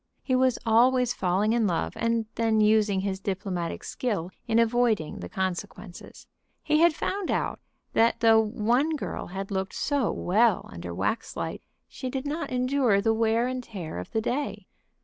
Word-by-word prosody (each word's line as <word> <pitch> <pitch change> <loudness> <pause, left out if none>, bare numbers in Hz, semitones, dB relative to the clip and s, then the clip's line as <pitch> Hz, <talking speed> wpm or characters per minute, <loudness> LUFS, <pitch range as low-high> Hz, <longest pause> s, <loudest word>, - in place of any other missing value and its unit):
He 260 - +1
was 255 -1 +3
always 245 +2 +4
falling 195 +4 +1
in 230 -3 +2
love, 170 -3 -1
and 230 -1 0
then 225 -1 +1
using 210 -2 +3
his 190 -1 -2
diplomatic 190 -3 -3
skill 195 -8 -3 0.2
in 225 -1 +2
avoiding 230 -7 +2
the 90 - -7
consequences. 190 0 -5 0.4
He 305 - +2
had 335 -1 +5
found 390 +2 -3
out - - -1 0.3
that 230 +1 +3
though 225 -1 +6
one 240 +8 +1
girl 295 - -5
had 195 +2 -6
looked 190 0 -2
so 285 -6 0
well 215 +3 +2
under 85 +1 -7
waxlight 220 - -3 0.3
she 260 - -6
did 265 +1 -4
not 310 +4 -3
endure 255 -4 +2
the 225 +2 +2
wear 225 +1 +2
and 255 0 -3
tear 180 - -6
of 90 - -7
the 220 - -1
day. 260 +5 -3
225 Hz, 165 wpm, -27 LUFS, 195-250 Hz, 0.4 s, though